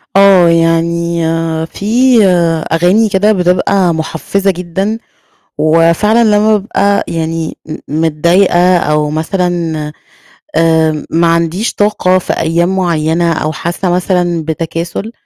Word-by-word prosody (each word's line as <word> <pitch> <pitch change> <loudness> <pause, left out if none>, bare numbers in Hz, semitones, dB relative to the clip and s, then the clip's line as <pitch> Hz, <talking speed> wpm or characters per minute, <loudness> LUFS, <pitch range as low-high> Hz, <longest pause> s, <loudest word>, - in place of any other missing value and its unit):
آه، 195 -3 +5
يعني 170 0 0 0.4
في 195 - -9 0.9
أغاني 180 +7 +2
كده 205 +2 +2
بتبقى 180 -1 +1
مُحفزة 165 +5 -2
جدًا، 185 +4 -3 0.6
وفعلًا 170 +8 +2
لمّا 215 0 +3
بابقى 200 0 0
يعني 165 -1 -4 0.3
م 155 +2 -2
متضايقة، 175 +3 +2
أو 150 -2 0
مثلًا 170 +1 -2 0.8
آآ 160 -2 +1
ما 170 +1 +1
عنديش 170 +6 0
طاقة 205 -3 +1
في 185 - -4
أيام 170 +3 0
مُعيّنة، 170 -1 0
أو 155 -1 -2
حاسة 175 +4 -3
مثلًا 175 -2 -1
بتكاسُل، 165 +6 -4
170 Hz, 105 wpm, -12 LUFS, 165-190 Hz, 0.9 s, آه